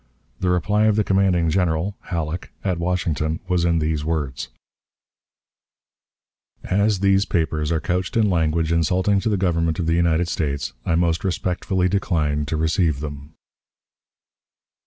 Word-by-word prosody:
The 95 Hz, -, 0 dB
reply 105 Hz, +5 st, +2 dB
of 110 Hz, -1 st, +3 dB
the 105 Hz, -, +2 dB
commanding 95 Hz, -4 st, +2 dB
General 90 Hz, +2 st, 0 dB
(Halleck) 85 Hz, -1 st, -4 dB
at 90 Hz, -3 st, -1 dB
Washington 80 Hz, -3 st, -1 dB
was 90 Hz, -2 st, +1 dB
in 85 Hz, -1 st, +2 dB
these 75 Hz, -1 st, -1 dB
words: 75 Hz, -4 st, -3 dB, 2.1 s
"As 100 Hz, 0 st, +1 dB
these 95 Hz, 0 st, +4 dB
papers 80 Hz, -3 st, -1 dB
are 80 Hz, -, +1 dB
couched 90 Hz, +4 st, -2 dB
in 110 Hz, -2 st, +4 dB
language 80 Hz, -3 st, +1 dB
insulting 90 Hz, +4 st, +2 dB
to 110 Hz, -, -1 dB
the 105 Hz, -, +1 dB
Government 85 Hz, -3 st, 0 dB
of 85 Hz, -, -2 dB
the 80 Hz, -, +1 dB
United 85 Hz, 0 st, +2 dB
States, 70 Hz, -6 st, -2 dB
I 85 Hz, -, +2 dB
most 85 Hz, 0 st, +1 dB
respectfully 90 Hz, 0 st, -1 dB
decline 75 Hz, -7 st, 0 dB
to 80 Hz, -, -1 dB
receive 80 Hz, -2 st, +1 dB
them." 75 Hz, +1 st, -8 dB
85 Hz, 140 wpm, -22 LUFS, 80-95 Hz, 2.1 s, these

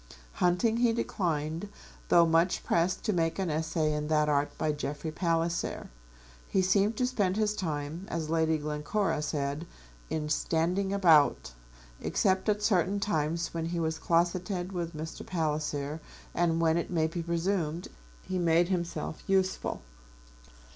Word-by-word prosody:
Hunting 180 Hz, +6 st, +3 dB
he 235 Hz, -1 st, +3 dB
declined, 165 Hz, -5 st, -2 dB, 0.4 s
though 170 Hz, -, +7 dB
much 165 Hz, +2 st, +2 dB
pressed 170 Hz, +2 st, +1 dB
to 215 Hz, -, +1 dB
make 165 Hz, -2 st, 0 dB
an 190 Hz, -4 st, -1 dB
essay 155 Hz, 0 st, 0 dB
in 150 Hz, 0 st, -2 dB
that 150 Hz, -1 st, +2 dB
art 145 Hz, 0 st, +2 dB
by 155 Hz, -, +1 dB
Jeffrey 150 Hz, +1 st, -4 dB
Palliser. 170 Hz, 0 st, -1 dB, 0.6 s
He 190 Hz, -, +1 dB
seemed 200 Hz, +4 st, +2 dB
to 250 Hz, -, +2 dB
spend 205 Hz, -7 st, 0 dB
his 210 Hz, -1 st, +1 dB
time, 160 Hz, 0 st, -4 dB
as 165 Hz, -2 st, -2 dB
Lady 160 Hz, 0 st, +2 dB
Glencora 150 Hz, +4 st, -1 dB
said, 150 Hz, +1 st, -2 dB, 0.4 s
in 155 Hz, -1 st, -2 dB
standing 170 Hz, +5 st, 0 dB
about, 165 Hz, -, +4 dB, 0.5 s
except 190 Hz, +2 st, +1 dB
at 210 Hz, 0 st, +1 dB
certain 200 Hz, -1 st, +2 dB
times 165 Hz, -4 st, -1 dB
when 165 Hz, -1 st, -2 dB
he 170 Hz, 0 st, -2 dB
was 160 Hz, -1 st, -1 dB
closeted 175 Hz, +2 st, 0 dB
with 170 Hz, -3 st, -4 dB
Mr. 160 Hz, +1 st, -6 dB
Palliser, 155 Hz, -2 st, -2 dB, 0.3 s
and 165 Hz, -1 st, +1 dB
when, 165 Hz, 0 st, +3 dB
it 170 Hz, -, -2 dB
may 165 Hz, -3 st, +1 dB
be 165 Hz, +2 st, -3 dB
presumed, 170 Hz, -1 st, -1 dB, 0.4 s
he 185 Hz, -, -2 dB
made 170 Hz, +1 st, +3 dB
himself 170 Hz, -4 st, -3 dB
useful. 190 Hz, -, 0 dB
170 Hz, 145 wpm, -29 LUFS, 155-185 Hz, 0.6 s, though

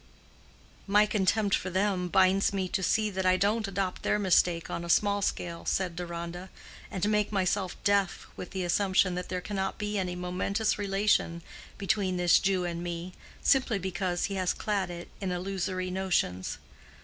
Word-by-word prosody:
"My 205 Hz, +1 st, +5 dB
contempt 205 Hz, 0 st, +1 dB
for 185 Hz, -, +1 dB
them 190 Hz, -1 st, 0 dB
binds 190 Hz, +2 st, +3 dB
me 190 Hz, -2 st, -1 dB
to 195 Hz, -, -1 dB
see 215 Hz, +3 st, +1 dB
that 190 Hz, 0 st, -2 dB
I 185 Hz, 0 st, +4 dB
don't 210 Hz, +3 st, +1 dB
adopt 195 Hz, -1 st, -2 dB
their -, -, +1 dB
mistake 180 Hz, -4 st, +2 dB
on 170 Hz, -, -4 dB
a 170 Hz, -, -7 dB
small 205 Hz, +3 st, +3 dB
scale," 170 Hz, -3 st, -2 dB
said 185 Hz, -3 st, -1 dB
Deronda, 175 Hz, +1 st, -6 dB, 0.4 s
"and 190 Hz, +1 st, -1 dB
make 210 Hz, -1 st, +1 dB
myself 190 Hz, -1 st, 0 dB
deaf 200 Hz, -2 st, +1 dB
with 180 Hz, -, -7 dB
the 190 Hz, -1 st, -3 dB
assumption 185 Hz, +1 st, +2 dB
that 180 Hz, 0 st, -4 dB
there 185 Hz, -1 st, -2 dB
cannot 190 Hz, 0 st, -3 dB
be 210 Hz, -1 st, -2 dB
any 180 Hz, -1 st, -2 dB
momentous 185 Hz, +5 st, -1 dB
relation 195 Hz, -4 st, +1 dB, 0.3 s
between 195 Hz, -2 st, 0 dB
this 175 Hz, -1 st, +5 dB
Jew 190 Hz, -2 st, +1 dB
and 170 Hz, -1 st, -3 dB
me, 175 Hz, +1 st, -5 dB, 0.3 s
simply 260 Hz, -5 st, +3 dB
because 180 Hz, -1 st, -2 dB
he 200 Hz, -, -1 dB
has 185 Hz, -2 st, 0 dB
clad 200 Hz, -4 st, -1 dB
it 175 Hz, 0 st, -7 dB
in 190 Hz, -2 st, -2 dB
illusory 185 Hz, 0 st, -2 dB
notions. 180 Hz, -, -1 dB
190 Hz, 170 wpm, -29 LUFS, 180-200 Hz, 0.4 s, My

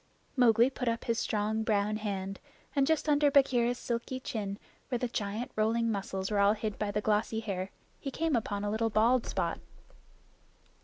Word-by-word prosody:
Mowgli 240 Hz, 0 st, +5 dB
put 250 Hz, -2 st, -4 dB
up 230 Hz, 0 st, 0 dB
his 230 Hz, -1 st, 0 dB
strong 215 Hz, +1 st, 0 dB
brown 215 Hz, -1 st, +1 dB
hand, 195 Hz, -2 st, -4 dB, 0.4 s
and 275 Hz, -1 st, +3 dB
just 320 Hz, -1 st, +1 dB
under 290 Hz, -1 st, +4 dB
Bagheera's 245 Hz, -4 st, +3 dB
silky 240 Hz, +2 st, -3 dB
chin, 205 Hz, -5 st, -4 dB, 0.3 s
where 250 Hz, -, 0 dB
the 250 Hz, -, -1 dB
giant 215 Hz, +1 st, -3 dB
rolling 225 Hz, +1 st, +2 dB
muscles 195 Hz, -1 st, -3 dB
were 205 Hz, -, +2 dB
all 200 Hz, +1 st, +5 dB
hid 215 Hz, -1 st, -4 dB
by 210 Hz, -, -1 dB
the 205 Hz, +1 st, -1 dB
glossy 215 Hz, +1 st, +1 dB
hair, 195 Hz, -4 st, -3 dB, 0.3 s
he 275 Hz, -, -4 dB
came 320 Hz, +1 st, 0 dB
upon 205 Hz, -3 st, -1 dB
a 205 Hz, -, -1 dB
little 225 Hz, +1 st, +1 dB
bald 230 Hz, +3 st, +3 dB
spot. -, -, -1 dB
220 Hz, 175 wpm, -31 LUFS, 205-245 Hz, 0.4 s, Mowgli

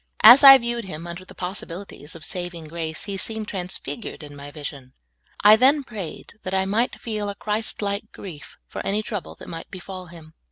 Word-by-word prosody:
As 245 Hz, +6 st, +11 dB
I 270 Hz, -1 st, +12 dB
viewed 235 Hz, -2 st, -3 dB
him 165 Hz, -3 st, -7 dB
under 170 Hz, +1 st, -7 dB
the -, -, -15 dB
possibilities 180 Hz, -4 st, -5 dB
of 165 Hz, -, -11 dB
vSaving 175 Hz, -3 st, -4 dB
grace, 160 Hz, -1 st, -3 dB
he 200 Hz, -1 st, -4 dB
seemed 220 Hz, +2 st, -2 dB
transfigured 190 Hz, +1 st, -5 dB
in 145 Hz, -1 st, -10 dB
my 140 Hz, 0 st, -9 dB
vision. 140 Hz, -3 st, -8 dB, 0.5 s
I 210 Hz, +1 st, +9 dB
then 275 Hz, +5 st, +4 dB
prayed 210 Hz, -10 st, -8 dB
that 185 Hz, +1 st, -3 dB
I 190 Hz, 0 st, +2 dB
might 225 Hz, +6 st, 0 dB
feel 210 Hz, -3 st, -3 dB
a 200 Hz, -, -5 dB
Christ 215 Hz, +1 st, -2 dB
like 200 Hz, +1 st, -3 dB
grief 170 Hz, -7 st, -10 dB
for -, -, -6 dB
an}' 200 Hz, +2 st, 0 dB
trouble 210 Hz, -4 st, -5 dB
that -, -, -12 dB
might 165 Hz, -, -7 dB
befall 185 Hz, 0 st, -8 dB
him. 165 Hz, -2 st, -13 dB
190 Hz, 195 wpm, -23 LUFS, 165-215 Hz, 0.5 s, I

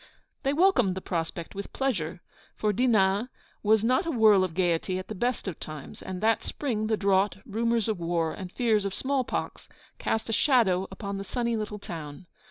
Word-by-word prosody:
They 275 Hz, -, +1 dB
welcomed 290 Hz, -, +3 dB
the -, -, -3 dB
prospect 165 Hz, -2 st, -4 dB
with 200 Hz, 0 st, -6 dB
pleasure, 180 Hz, -11 st, -1 dB, 0.3 s
for 210 Hz, -1 st, 0 dB
Dinan 210 Hz, -1 st, +3 dB, 0.3 s
is 215 Hz, 0 st, +4 dB
not 255 Hz, +7 st, +2 dB
a -, -, +1 dB
whirl 215 Hz, -7 st, +5 dB
of 175 Hz, -3 st, -3 dB
gaiety 180 Hz, 0 st, +1 dB
at 185 Hz, -, -6 dB
the -, -, -3 dB
best 240 Hz, +2 st, -1 dB
of 180 Hz, -, -4 dB
times: 155 Hz, -3 st, -8 dB
and 185 Hz, 0 st, -6 dB
that 225 Hz, +1 st, +3 dB
spring 220 Hz, -7 st, -2 dB
the 220 Hz, -1 st, +1 dB
drought, 200 Hz, 0 st, +2 dB
rumours 230 Hz, +1 st, 0 dB
of 215 Hz, -5 st, -1 dB
war, 165 Hz, -1 st, 0 dB
and 185 Hz, -2 st, -7 dB
fears 220 Hz, -3 st, +2 dB
of 195 Hz, -1 st, -3 dB
small 270 Hz, -1 st, 0 dB
pox, -, -, -4 dB, 0.3 s
cast 220 Hz, -, -1 dB
a 225 Hz, -, -1 dB
shadow 210 Hz, -, +3 dB
upon 200 Hz, 0 st, -5 dB
the -, -, -4 dB
sunny 235 Hz, +3 st, -1 dB
little 210 Hz, -1 st, -3 dB
town. 160 Hz, -5 st, -8 dB
205 Hz, 190 wpm, -28 LUFS, 185-230 Hz, 0.3 s, whirl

